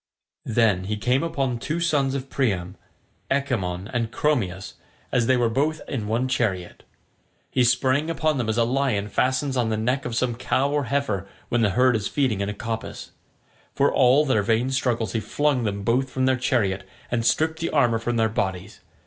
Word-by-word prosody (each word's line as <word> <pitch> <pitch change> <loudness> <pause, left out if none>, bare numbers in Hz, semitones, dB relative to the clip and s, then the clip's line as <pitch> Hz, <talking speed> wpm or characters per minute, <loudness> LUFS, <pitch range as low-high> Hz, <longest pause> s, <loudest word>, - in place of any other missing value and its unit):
Then 110 -5 +2
he 105 +2 -2
came 125 +6 +1
upon 135 -7 -1
two 155 +7 -2
sons 145 -5 +1
of 135 -1 -4
Priam, 100 -10 -1 0.5
Echemmon 105 -10 -1
and 115 -2 -1
Chromius, 110 -10 -1 0.4
as 120 -2 +2
they 130 - +4
were 120 -1 +2
both 145 +7 0
in 115 -7 -3
one 115 +4 0
chariot. 100 -9 -2 0.7
He 130 - +3
sprang 130 +5 +2
upon 155 -3 0
them 115 -2 -1
as 110 - 0
a 120 - +4
lion 120 -5 0
fastens 130 +5 0
on 120 -3 +1
the 110 - 0
neck 130 +5 0
of 120 -2 -3
some 120 0 +1
cow 125 +3 0
or 145 -1 0
heifer 110 -7 -1 0.2
when 120 - +1
the 105 - +3
herd 125 -1 +4
is 105 -3 -1
feeding 125 -9 0
in 100 - -1
a - - -3
coppice. 115 +1 -5 0.6
For 140 - +2
all 135 +4 +5
their 130 -7 +2
vain 115 +5 +1
struggles 120 -6 0
he 115 - -1
flung 140 +1 0
them 100 -1 -2
both 125 +5 +1
from 130 0 -1
their 130 0 +3
chariot 110 -7 0 0.3
and 120 -1 0
stripped 160 +6 +1
the 165 - -1
armour 120 -6 +2
from 120 +1 -2
their 110 -1 +3
bodies. 95 -2 -3
120 Hz, 190 wpm, -24 LUFS, 110-135 Hz, 0.7 s, all